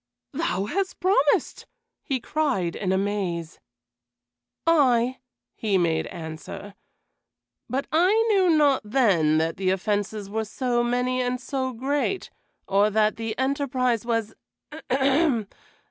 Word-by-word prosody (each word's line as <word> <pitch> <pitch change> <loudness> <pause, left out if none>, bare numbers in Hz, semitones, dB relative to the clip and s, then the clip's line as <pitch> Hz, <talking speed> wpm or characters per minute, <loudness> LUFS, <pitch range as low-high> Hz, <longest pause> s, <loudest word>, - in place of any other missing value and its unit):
"Thou 200 - -1
hast 375 - -2
promised!" 365 -6 +1 0.3
he 265 -2 -2
cried 250 - -1
in 190 -2 -2
amaze. 190 -4 -2 1.1
"Ay," 260 -6 +3 0.3
he 210 -3 0
made 165 -3 +1
answer, 160 +5 -8 1.0
"but 270 +3 -1
I 345 +4 +4 0.2
knew 380 -3 +4
not 295 -4 +4
then 200 - +3
that 160 +1 0
the 190 0 0
offenses 205 +2 -1
were 220 +2 -2
so 240 +2 -1
many 250 +1 0
and 250 0 -1
so 260 0 -3
great, 280 +9 -2 0.4
or 200 +2 +3
that 215 0 +2
the 225 -1 -4
enterprise 260 -3 0
was 230 -2 -1 0.6
ahem! 270 -2 +2
240 Hz, 115 wpm, -25 LUFS, 200-275 Hz, 1.1 s, I